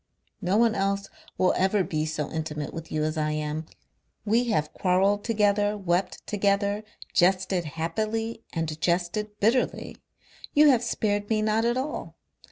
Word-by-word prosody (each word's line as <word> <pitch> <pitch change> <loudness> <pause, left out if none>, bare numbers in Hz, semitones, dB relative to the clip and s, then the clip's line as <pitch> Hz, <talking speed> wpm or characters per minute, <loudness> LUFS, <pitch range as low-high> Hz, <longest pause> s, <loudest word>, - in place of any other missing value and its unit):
No 190 +2 +1
one 230 -1 +4
else 200 0 -1 0.3
will 185 - +3
ever 190 +1 +2
be 155 -2 -2
so 155 -2 -2
intimate 155 -2 -4
with 165 0 -7
you 155 0 0
as 155 +1 -1
I 150 0 0
am. 155 +1 -3 0.6
We 230 +4 +3
have 155 -10 0
quarrelled 195 +2 +2
together, 210 -2 +2
wept 185 -1 -1
together, 200 0 +1 0.3
jested 185 -1 +2
happily 215 +9 -2
and 160 -2 -3
jested 185 +5 -1
bitterly. 235 +5 +1 0.6
You 300 0 +7
have 250 -4 +4
spared 205 -3 -1
me 215 -1 +1
not 220 +1 +2
at 240 +1 +1
all. 275 +4 -4
200 Hz, 150 wpm, -26 LUFS, 165-215 Hz, 0.6 s, You